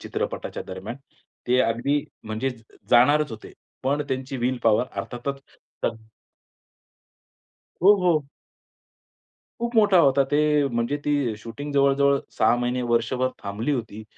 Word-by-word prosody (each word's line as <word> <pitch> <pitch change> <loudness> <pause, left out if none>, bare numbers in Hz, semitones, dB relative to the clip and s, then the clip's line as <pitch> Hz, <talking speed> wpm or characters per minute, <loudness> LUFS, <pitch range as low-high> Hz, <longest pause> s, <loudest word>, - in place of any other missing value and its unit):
चित्रपटाच्या - - -4
दरम्यान, 95 +6 -7 0.5
ते 125 +1 +3
अगदी 130 +5 +1 0.2
म्हणजे 110 +4 -2
ज 120 -3 -12 0.3
जाणारच 145 +4 +5
होते 110 -1 -9 0.3
पण 140 +3 0
त्यांची 130 0 -3
विल 125 +1 -1
पॉवर 115 +1 +4
अर्थातच 135 +3 -5 0.4
तक 115 - 0 1.9
हो, 200 +3 +8
हो. 160 -5 +2 1.4
खूप 235 0 -2
मोठा 205 -4 +5
होता 140 -2 +4
ते 145 - +2 0.3
म्हणजे 120 +3 -1
ती 145 -6 0
शूटिंग 140 +7 -7
जवळ-जवळ 140 0 +3 0.2
6 - - +4
महिने-वर्षभर 120 0 0
थांबली 105 +8 -2
होती. 110 -4 -4
130 Hz, 120 wpm, -24 LUFS, 115-145 Hz, 1.9 s, हो